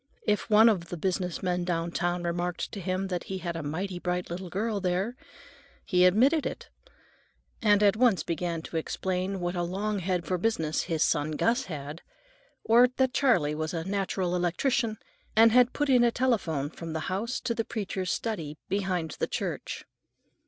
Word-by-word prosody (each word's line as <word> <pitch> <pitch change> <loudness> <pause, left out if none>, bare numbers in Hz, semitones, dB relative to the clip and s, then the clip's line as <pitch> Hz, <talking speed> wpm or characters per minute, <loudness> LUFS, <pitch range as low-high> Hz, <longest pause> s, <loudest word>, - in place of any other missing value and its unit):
If 210 +1 0
one 220 +1 +7
of 180 -7 +1
the 175 - -5
business 180 0 -2
men 180 -1 0
downtown 175 0 -1
remarked 175 +1 -2
to 205 - -6
him 185 +1 -2
that 180 -2 -3
he 190 - -4
"had 175 -2 -4
a 165 - -3
mighty 175 +5 -3
bright 180 -1 -2
little 180 +1 -5
girl, 210 +3 -1
there," 185 +6 -1 0.7
he 180 -2 +4
admitted 260 - +4
it, - - -5 0.9
and 210 -2 +4
at 200 0 +5
once 230 -4 +3
began 170 -1 -2
to 165 - -5
explain 185 +3 -2
what 175 +1 -2
a 175 - 0
"long 200 +4 -2
head 180 -1 -1
for 180 -1 -1
business" 165 -7 0
his 165 -3 +1
son 150 0 +1
Gus 235 - +1
had, 150 0 -7 0.6
or 235 +3 +6
that 260 -1 +2
Charley 180 - +3
was 155 +2 -3
"a 165 - -2
natural 190 -2 -1
electrician," 215 +6 0 0.4
and 225 +1 +7
had 250 +1 +5
put 290 - -1
in 250 -3 +5
a 240 - +5
telephone 185 - 0
from 165 -1 -7
the 160 - -2
house 205 +9 -2
to 235 - -1
the 225 - -1
preacher's 190 -5 -3
study 165 -10 -3
behind 185 -5 -1
the - - 0
church. - - -4
185 Hz, 180 wpm, -28 LUFS, 170-215 Hz, 0.9 s, one